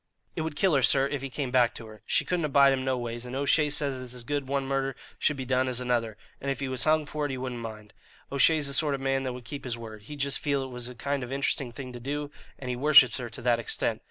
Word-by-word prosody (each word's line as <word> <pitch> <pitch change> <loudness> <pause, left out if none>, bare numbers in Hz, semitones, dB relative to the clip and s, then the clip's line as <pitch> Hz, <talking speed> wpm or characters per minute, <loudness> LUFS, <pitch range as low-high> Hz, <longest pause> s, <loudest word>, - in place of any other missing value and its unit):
"It 165 - -2
would 160 -2 -3
kill 185 +2 +3
her, 140 - +4
sir, 135 +1 +5
if 140 -1 -3
he 135 - -4
came 130 -1 -3
back 125 -2 +3
to 115 - -8
her. 110 -1 -13
She - - +2
couldn't 175 -3 0
abide 140 -1 +5
him 130 -1 -1
no 130 -1 0
ways, 120 -1 -4
and 125 - -6
O'Shea 140 +2 +3
says 140 -3 0
it's 125 -1 -8
as 125 - -6
good 145 +1 -2
one 140 0 -1
murder 135 0 -1 0.2
should 150 - +1
be 130 - -4
done 130 0 +1
as 125 -1 -1
another, 120 -4 -1 0.2
and 140 - -3
if 135 - -2
he 140 - -2
was 130 -2 0
hung 155 0 +3
for 150 0 -3
it - - -9
he 135 - -3
wouldn't 125 -2 -4
mind. 110 -2 -8 0.4
O'Shea's 150 +2 +4
the 140 - -2
sort 145 0 +3
of 135 - -7
man 135 0 +1
that 130 - -2
would 125 -1 -9
keep 140 +4 -7
his 120 -2 -4
word. 110 -2 -9
He'd 145 +8 -9
just 140 0 +2
feel 140 -2 0
it 130 - -7
was 125 0 -5
a 125 - -10
kind 140 +3 -2
of 125 0 -6
interesting 135 -2 -1
thing 125 +1 -8
to 120 - -7
do, 145 +3 -4 0.3
and 130 - -8
he - - -2
worships 140 -1 +6
her 125 -2 -5
to 115 - -7
that 120 -1 +3
extent. 115 - +1
135 Hz, 295 wpm, -28 LUFS, 125-140 Hz, 0.4 s, worships